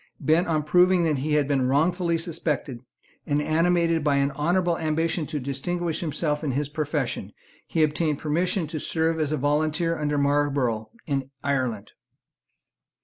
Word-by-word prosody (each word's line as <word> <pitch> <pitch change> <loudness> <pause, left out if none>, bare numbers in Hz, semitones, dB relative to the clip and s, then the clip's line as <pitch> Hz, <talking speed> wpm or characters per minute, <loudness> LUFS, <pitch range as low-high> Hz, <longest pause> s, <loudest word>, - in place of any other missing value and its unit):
Bent 160 +3 +2
on 155 -2 +1
proving 180 +3 +4
that 155 -4 +1
he 150 +3 -1
had 150 -2 +2
been 135 -3 +1
wrongfully 170 +5 +2
suspected, 160 -6 -3 0.5
and 145 0 +1
animated 165 +1 +2
by 145 -2 +2
an 140 0 +2
honourable 175 +4 +1
ambition 160 0 0
to 155 -2 -3
distinguish 160 +5 -2
himself 150 -2 -1
in 140 -4 -1
his 145 +2 -1
profession, 150 -3 -2 0.4
he 160 - +1
obtained 150 0 +1
permission 170 +5 0
to 155 0 -5
serve 160 +1 0
as 155 -2 0
a 155 - 0
volunteer 155 +4 0
under 150 -1 0
Marlborough 140 -6 +1 0.2
in 135 -3 -2
Ireland. 130 -7 -1
155 Hz, 150 wpm, -25 LUFS, 145-165 Hz, 0.5 s, proving